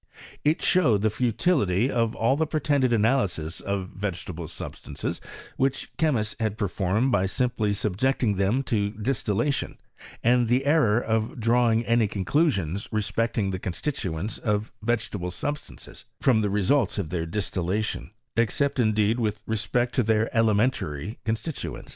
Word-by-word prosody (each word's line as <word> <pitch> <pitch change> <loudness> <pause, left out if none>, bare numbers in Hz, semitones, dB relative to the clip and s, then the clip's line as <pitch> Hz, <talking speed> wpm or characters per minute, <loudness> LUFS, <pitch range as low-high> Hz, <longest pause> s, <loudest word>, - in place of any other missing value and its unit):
It 150 +2 +2
showed 120 - +3
the 110 - +3
futility 120 - +1
of 115 -1 0
all 115 +4 +2
tha 160 +2 0
pretended 145 -4 +1
analyses 105 - +1
of 100 -2 -3
vegetable 90 -4 -5
substances, 85 - -6 0.4
which 135 0 0
ehemists 120 -10 +1
had 110 -2 -1
performed 105 +4 0
by 95 -5 +2
simply 120 -1 0
subjecting 105 +3 0
thent 105 +8 +1
to 105 -4 +1
distillation, 115 +4 -1 0.5
and 120 0 +4
the 125 +4 +2
error 140 -8 +4
of 110 0 -1
drawing 115 0 +3
any 115 -1 +3
conclu 100 - +1
sioas 100 - -2
respecting 110 -1 0
the 95 - -3
constituents 95 - -3
of 105 -1 -1
vegetable 105 -6 -1
sub 145 - -2
stances - - -11
from 120 -5 +3
the 105 - 0
results 105 +4 +2
of 90 -6 -3
their 85 -2 -2
distillation, 100 +2 -2 0.3
except 135 +4 +1
indeed 110 0 +2
with 110 -2 -1
respect 115 +3 0
to 130 - +2
their 110 0 +1
elementary 105 - +1
constituent. 110 - -4
110 Hz, 140 wpm, -26 LUFS, 100-125 Hz, 0.5 s, and